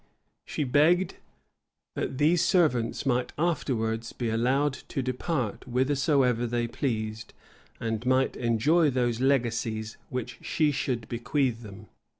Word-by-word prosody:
She - - -2
begged 160 +7 +3 0.8
that 130 - -3
these 160 +4 +3
servants 125 -12 +2
might 125 -2 0
afterwards 115 -9 -1
be 120 -2 -2
allowed 130 +5 +2
to 135 - -3
depart 130 - -2
whithersoever 130 -1 +2
they 120 0 0
pleased, 110 -3 -3 0.4
and 115 -1 -2
might 130 +1 +2
enjoy 135 +8 +3
those 120 -2 0
legacies 120 -4 0
which 125 -2 -5
she 155 -2 +1
should 125 -5 -2
bequeath 125 0 -1
them. 105 -1 -11
125 Hz, 120 wpm, -27 LUFS, 115-140 Hz, 0.8 s, begged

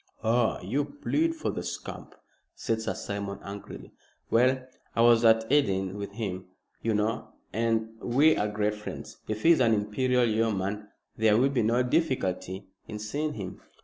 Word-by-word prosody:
"Ah! 115 +1 +2
you 145 +3 0
plead 310 - -1
for 320 - -2
the - - -4
scamp," - - -7 0.4
said 110 -1 -1
Sir - - -2
Simon, 100 -1 -4
angrily. 100 0 -9 0.4
"Well, 130 +2 +3 0.3
I 115 - +3
was 120 0 +6
at 110 -1 +5
Eton 95 -9 +2
with 100 -1 -6
him, 95 -4 -4 0.4
you 115 -1 0
know, 105 +2 0 0.3
and 115 0 +1
we 145 +6 +4
are 105 - 0
great 105 0 0
friends. 105 0 -8
If 110 0 -3
he 170 - +7
is 165 - +5
an 115 -3 +4
Imperial 125 +4 +1
Yeoman 105 -2 0 0.3
there 110 -1 +4
will 130 +4 +4
be 130 - +1
no 115 +3 +2
difficulty 105 - -1 0.2
in 105 - -6
seeing 145 +9 -2
him." 95 -4 -7
110 Hz, 165 wpm, -28 LUFS, 105-125 Hz, 0.4 s, he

